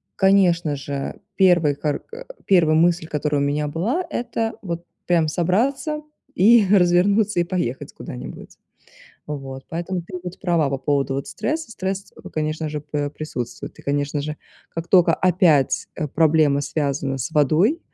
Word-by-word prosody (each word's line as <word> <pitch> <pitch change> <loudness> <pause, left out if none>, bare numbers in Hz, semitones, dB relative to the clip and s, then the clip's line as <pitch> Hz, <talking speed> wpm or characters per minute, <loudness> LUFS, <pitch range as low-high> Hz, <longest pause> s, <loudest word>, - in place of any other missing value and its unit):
конечно 180 -6 +3
же, 140 0 -5 0.2
первый 175 -6 +4
хар 145 0 -2
к - - -11 0.2
первая 165 -5 +4
мысль, 170 0 +2
которая 150 -1 -1
у - - +2
меня 150 +1 0
была, 190 - -1
это 230 -4 -2
вот 170 -3 -5 0.2
прям 170 -3 +3
собраться 245 - 0 0.3
и 220 +3 +6
развернуться, 195 +2 +4
и - - +2
поехать 170 -8 -3
куда-нибудь. 60 - -9 0.7
Вот, 135 -2 -6
поэтому 175 +2 -3
ты 180 +2 -7
будь 180 0 -7
права 170 -7 +1
по 135 - -1
поводу 140 0 0
вот 135 - -3
стресса. 315 -4 -3
Стресс- 195 0 -4 0.2
конечно 155 0 -2
же, 150 0 -4
п 145 -1 -3
присутствует. 150 -5 -6
И, - - -13
конечно 145 +1 -1
же, 150 +1 -4 0.3
как 165 0 -5
тока 180 -2 +5
опять, 180 0 +3
э, 155 - -2
проблема 155 -1 +3
связана 140 -2 -2
с 125 - -3
водой 160 - +3
165 Hz, 150 wpm, -22 LUFS, 145-190 Hz, 0.7 s, и